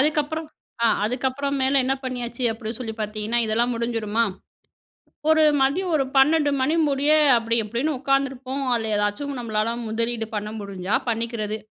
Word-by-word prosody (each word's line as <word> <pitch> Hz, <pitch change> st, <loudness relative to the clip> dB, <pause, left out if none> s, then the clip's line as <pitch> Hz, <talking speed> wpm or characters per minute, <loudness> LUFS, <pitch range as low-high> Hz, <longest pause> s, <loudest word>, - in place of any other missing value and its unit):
அதுக்கப்புறம். 305 Hz, +2 st, 0 dB, 0.4 s
ஆ -, -, +6 dB, 0.2 s
அதுக்கப்புறமேல 265 Hz, +3 st, 0 dB
என்ன 265 Hz, -, +1 dB
பண்ணியாச்சு 245 Hz, -1 st, -4 dB
அப்டி 225 Hz, -1 st, -6 dB
சொல்லி 225 Hz, -3 st, -5 dB
பார்த்தீங்கன்னா 215 Hz, +2 st, -1 dB
இதெல்லாம் 230 Hz, +3 st, +1 dB
முடிஞ்சுடுமா 230 Hz, -1 st, 0 dB, 1.0 s
ஒரு 315 Hz, 0 st, +5 dB, 0.2 s
மதியம் 330 Hz, +7 st, +1 dB
ஒரு 275 Hz, -, +1 dB
12:00 290 Hz, +2 st, +4 dB
மணி 300 Hz, +5 st, +2 dB
முடிய 280 Hz, +1 st, +1 dB, 0.3 s
அப்டி 230 Hz, 0 st, 0 dB
இப்டின்னு 245 Hz, +8 st, -1 dB
உட்காந்துருப்போம். 275 Hz, 0 st, -1 dB
அதில 220 Hz, -2 st, -1 dB
ஏதாச்சும் 205 Hz, +8 st, -1 dB
நம்மளால 225 Hz, -1 st, -1 dB
முதலீடு 230 Hz, 0 st, -2 dB
பண்ண 210 Hz, 0 st, -3 dB
முடிஞ்சா 195 Hz, -1 st, -4 dB
பண்ணிக்கிறது. 225 Hz, -2 st, -2 dB
240 Hz, 135 wpm, -23 LUFS, 220-275 Hz, 1.0 s, ஆ